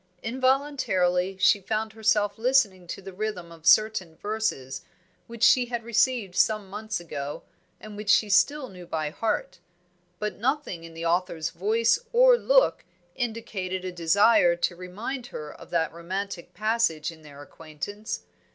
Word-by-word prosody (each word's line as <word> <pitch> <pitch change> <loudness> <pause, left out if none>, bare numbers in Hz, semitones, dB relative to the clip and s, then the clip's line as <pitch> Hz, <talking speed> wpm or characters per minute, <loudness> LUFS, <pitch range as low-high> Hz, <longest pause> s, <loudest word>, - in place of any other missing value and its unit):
Involuntarily 225 -8 +1
she 200 +2 +4
found 215 +2 -2
herself 215 -1 +1
listening 225 -8 +2
to 190 - -7
the 195 0 -9
rhythm 185 -4 -4
of 165 -1 -10
certain 215 -6 +4
verses 205 -11 -3 0.5
which 235 -1 -6
she 250 0 +6
had 240 -1 -4
received 230 -3 +1
some 215 -3 +1
months 215 0 -4
ago, 145 -4 -6 0.4
and 215 -1 -10
which 205 0 -6
she 215 - +5
still 260 +8 +3
knew 180 -5 -12
by 155 -2 -2
heart; 185 -3 -2 0.6
but 210 +2 -4
nothing 255 - -1
in 165 -1 -11
the 165 +1 -5
author's 165 -2 0
voice 220 - +2
or - - +7
look - - +3 0.3
indicated 200 -6 -4
a 185 - -3
desire 175 +2 +4
to 175 +1 -1
remind 215 +9 -6
her 150 -8 -8
of - - -14
that 160 -2 0
romantic 180 +2 -5
passage 215 -8 0
in 160 -1 -15
their 145 -2 -13
acquaintance. 165 - -7
200 Hz, 150 wpm, -26 LUFS, 170-225 Hz, 0.6 s, or